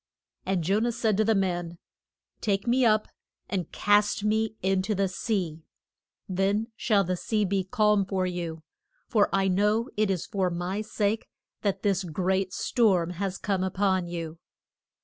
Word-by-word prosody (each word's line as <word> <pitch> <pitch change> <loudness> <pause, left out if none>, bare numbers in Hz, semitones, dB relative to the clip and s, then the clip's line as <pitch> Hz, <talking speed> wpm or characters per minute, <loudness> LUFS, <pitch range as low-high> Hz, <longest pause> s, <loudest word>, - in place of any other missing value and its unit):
And 190 -3 +1
Jo 195 +6 +2
nah 235 +2 +1
said 225 -2 +1
to 215 - +4
the 220 0 +2
men, 175 -3 -1 0.6
Take 200 -1 0
me 250 +2 +3
up 215 -2 +3 0.4
and 185 -5 -3
cast 205 0 +2
me 220 +1 +1
in 190 0 +2
to 210 +3 -1
the 195 0 +1
sea; 180 -4 -2 0.7
then 200 +5 0
shall 210 -4 +2
the 185 0 -1
sea 210 +3 0
be 195 0 0
calm 210 0 +2
for 190 -2 0
you, 170 -3 -4 0.4
for 210 -3 +3
I 195 0 +2
know 210 +6 +2
it 215 -1 +2
is 185 -4 -1
for 190 -4 0
my 180 +4 -3
sake 215 0 -1 0.3
that 200 -2 -1
this 200 -2 +1
great 185 +3 -1
storm 185 -7 +2
has 190 +1 -3
come 195 -3 -1
up 190 0 -3
on 190 -3 +2
you. 165 -1 -5
195 Hz, 170 wpm, -27 LUFS, 185-210 Hz, 0.7 s, to